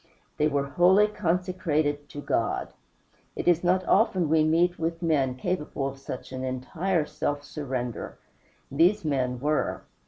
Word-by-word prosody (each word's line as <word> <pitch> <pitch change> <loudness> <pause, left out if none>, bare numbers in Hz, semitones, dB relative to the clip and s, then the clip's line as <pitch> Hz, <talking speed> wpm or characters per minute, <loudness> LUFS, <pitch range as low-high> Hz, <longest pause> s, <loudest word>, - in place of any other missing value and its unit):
They 150 - +3
were 140 -2 0
wholly 180 +8 +5
consecrated 170 -6 -1
to 145 - -7
God. - - -1 0.6
It - - -4
is 175 -1 +4
not 185 +1 +2
often 190 -6 +3
we 155 0 +4
meet 170 +3 +2
with 165 +1 -2
men 140 -6 +1
capable 150 -2 -2
of 135 0 -12 0.3
an 130 0 -5
entire 155 +7 -1
self 145 -1 -3
surrender; 130 -5 -5 0.5
these 170 +7 +3
men 130 -4 0
were. 150 +3 -1
155 Hz, 135 wpm, -27 LUFS, 140-180 Hz, 0.6 s, wholly